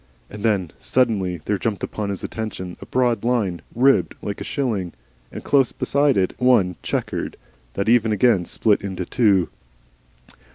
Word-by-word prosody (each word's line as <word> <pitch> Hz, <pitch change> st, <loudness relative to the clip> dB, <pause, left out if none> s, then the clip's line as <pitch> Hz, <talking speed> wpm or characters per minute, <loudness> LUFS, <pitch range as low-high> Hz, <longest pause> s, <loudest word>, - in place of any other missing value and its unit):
And 105 Hz, -, -8 dB
then 100 Hz, -7 st, +1 dB
suddenly 100 Hz, -9 st, 0 dB
there 105 Hz, -2 st, 0 dB
jumped 105 Hz, -1 st, -2 dB
upon 105 Hz, -2 st, -3 dB
his 100 Hz, -, -4 dB
attention 95 Hz, -5 st, -5 dB
a -, -, -9 dB
broad 125 Hz, -3 st, +1 dB
line 105 Hz, -9 st, 0 dB
ribbed 120 Hz, -, +3 dB
like 100 Hz, -, -4 dB
a -, -, -2 dB
shilling, 110 Hz, -, -2 dB, 0.4 s
and -, -, -8 dB
close 135 Hz, -4 st, +3 dB
beside 140 Hz, -4 st, +1 dB
it 95 Hz, -1 st, +1 dB
one 120 Hz, -8 st, +3 dB
chequered, -, -, -3 dB, 0.4 s
that 100 Hz, -, -1 dB
ever 115 Hz, -1 st, +4 dB
and 110 Hz, -, +1 dB
again 100 Hz, -4 st, +3 dB
split 105 Hz, +2 st, +1 dB
into 95 Hz, -2 st, -4 dB
two. 100 Hz, -6 st, +2 dB
105 Hz, 160 wpm, -22 LUFS, 95-120 Hz, 0.4 s, ever